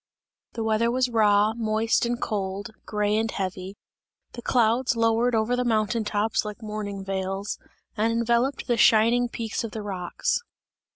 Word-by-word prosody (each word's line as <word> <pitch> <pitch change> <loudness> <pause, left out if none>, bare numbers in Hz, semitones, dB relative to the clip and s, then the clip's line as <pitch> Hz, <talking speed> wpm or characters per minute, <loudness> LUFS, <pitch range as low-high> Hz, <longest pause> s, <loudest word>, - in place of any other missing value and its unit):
The 225 - -3
weather 220 +1 +2
was 250 +1 +1
raw, 210 -1 +4
moist 225 0 +1
and 240 0 -2
cold, 200 0 -3 0.2
grey 210 0 0
and 220 +1 0
heavy; 190 0 -4 0.5
the 240 - -8
clouds 240 +1 +2
lowered 230 +1 +2
over 220 +3 +1
the 250 - 0
mountain 225 -1 +1
tops 210 +1 0
like 210 +2 -7
mourning 205 -2 -5
veils, 195 +1 -3 0.4
and 220 +2 +1
enveloped 235 +4 +1
the 240 -2 +1
shining 235 +3 +4
peaks 225 -1 -3
of 230 - -6
the 220 - -5
rocks. 195 - -2
220 Hz, 155 wpm, -25 LUFS, 205-235 Hz, 0.5 s, raw